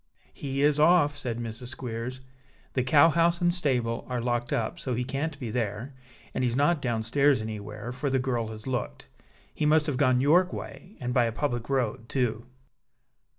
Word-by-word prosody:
"He 140 0 -2
is 150 0 +3
off," 150 -2 +5
said 125 -5 -3
Mrs. 120 +1 -6
Squeers. 125 0 -5 0.5
"The 130 - +1
cow 145 +5 +6
house 170 +1 +2
and 175 0 +2
stable 125 -9 0
are 125 -1 -1
locked 120 0 -1
up, 110 - -1
so 130 -2 -2
he 125 - -1
can't 140 +3 -3
be 120 -4 -4
there; 115 +3 -3 0.4
and - - -1
he's 120 -1 +1
not 145 +3 +2
down 115 -4 -1
stairs 140 +3 +3
anywhere, 105 +1 -6
for 135 +3 -2
the 135 - +2
girl 125 -3 -1
has 110 -1 -9
looked. 120 - -4 0.4
He 150 - 0
must 155 0 +4
have 145 -4 -1
gone 130 -2 +3
York 175 +7 +4
way, 190 +5 -8
and 125 -3 -3
by 125 -2 +4
a 115 - 0
public 120 0 -2
road, 120 -4 -1
too." 120 -3 -1
130 Hz, 190 wpm, -27 LUFS, 115-145 Hz, 0.5 s, cow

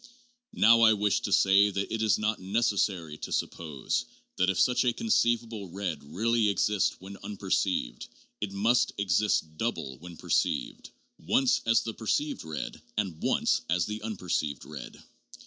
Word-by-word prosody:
Now 115 +1 +6
I 110 -1 +7
wish 105 -2 +1
to - - -4
say 100 +1 +5
that 100 +1 -3
it 110 - -2
is 110 -2 +3
not 105 +1 -1
neces 105 +2 0
sary 85 -6 -1
to - - -7
suppose 75 -5 -2 0.3
that, 90 +1 +2
if 95 - 0
such 125 0 +3
a 125 -2 +2
conceivable 115 - 0
red 90 -5 -4
really 110 +8 +1
exists 100 0 +1
when 95 +2 -10
unperceived, 95 -10 -2 0.3
it 105 -2 -2
must 115 +5 +2
exist 95 -5 +1
double 65 -3 -3
when 85 0 -11
perceived— - - -1 0.3
once 130 -2 +2
as 115 -1 +4
the 115 - -4
perceived 115 +8 -2
red 80 -2 -6 0.2
and 95 -7 -2
once - - +1
as 90 0 +2
the 105 +1 -5
unperceived 90 -9 -3
red. - - -10
100 Hz, 155 wpm, -28 LUFS, 90-110 Hz, 0.3 s, I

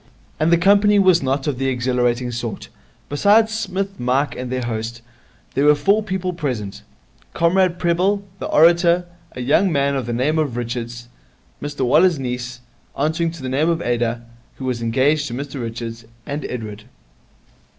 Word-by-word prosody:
And 155 +2 +2
the 170 - +6
company 205 +3 +4
was 185 -3 +5
not 135 +1 -1
of 140 -4 -2
the 135 - 0
exhilarating 125 -1 0
sort. 120 -3 -5 0.4
Besides 210 +9 +3
Psmith 195 -3 -3
and - - -24
Mike 130 +4 0
and 125 0 -5
their 130 -1 -2
host, 115 0 -4 0.5
there 140 - +1
were 150 0 +6
four 200 +9 +2
people 190 -3 -3
present 125 - -4 0.5
Comrade 175 +1 +2
Prebble, 185 +4 +1 0.2
the - - -4
orator; 170 +2 +4 0.3
a 125 - -6
young 150 +9 +3
man 140 -2 +1
of 130 -4 -3
the - - -2
name 145 +7 +1
of 140 -6 -1
Richards; 120 0 -5 0.5
Mr 145 -2 -2
Waller's 165 +6 +4
niece, 125 -1 -5 0.4
answering 160 +3 0
to 165 -4 -9
the - - -3
name 140 +6 +1
of 165 -1 +1
Ada, 120 -1 -1 0.3
who 130 - -7
was 125 -2 -2
engaged 135 +6 +1
to 120 - -5
Mr 140 0 -5
Richards; 115 0 -6 0.2
and 145 +1 -4
Edward. 110 -3 -6
140 Hz, 170 wpm, -20 LUFS, 120-170 Hz, 0.5 s, the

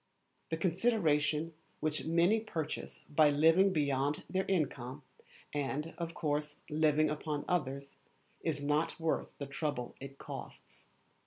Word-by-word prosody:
The 160 - -1
consideration 165 -4 +2 0.3
which 155 -3 0
many 170 +7 +4
purchase 160 -8 -4
by 150 0 +5
living 165 +7 +5
beyond 145 -2 +1
their 190 0 0
income, 140 -6 -1 0.5
and, 145 +2 -2
of 170 -1 -4
course, 150 -1 -1
living 155 0 +3
upon 150 -1 -3
others, 140 -5 -2 0.4
is 150 -3 -1
not 150 +4 +1
worth 160 -1 0
the 140 - -4
trouble 140 -3 -3
it 135 0 -9
costs. - - -9
150 Hz, 125 wpm, -33 LUFS, 145-165 Hz, 0.5 s, by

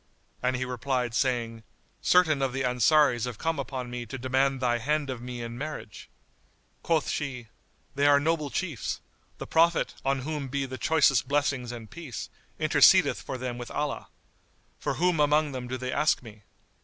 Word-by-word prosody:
And 125 +1 +1
he 130 +1 -2
replied, 125 -1 -2
saying, 120 -3 0 0.4
"Certain 160 -6 +4
of 135 -2 0
the 135 0 -1
Ansaris 125 0 +3
have 125 -4 -5
come 165 +2 -1
upon 130 -2 -5
me 120 -1 -5
to 135 - -6
demand 130 +1 +1
thy 120 -2 +1
hand 145 +3 0
of 125 -2 -6
me 125 -1 -6
in 115 +1 -6
marriage." 155 +2 -7 0.7
Quoth 160 -3 +1
she, 125 -6 -4 0.4
"They 140 +1 +2
are 145 0 +6
noble 155 0 0
chiefs; 160 - -3 0.4
the - - -6
Prophet, 165 +1 +2
on 135 0 0
whom 145 0 -4
be 140 +1 -2
the 130 0 -7
choicest 140 -6 +3
blessings 140 -3 0
and 115 -2 -8
peace, 150 -3 -7 0.3
intercedeth - - +5
for 130 - -5
them 125 -1 -4
with 120 - -7
Allah. 150 -1 -3 0.7
For - - -2
whom 175 -1 +1
among 150 0 +3
them 125 -2 -5
do 130 +1 -3
they 130 0 -4
ask 150 -2 +2
me?" 105 -3 -12
130 Hz, 175 wpm, -27 LUFS, 125-150 Hz, 0.7 s, are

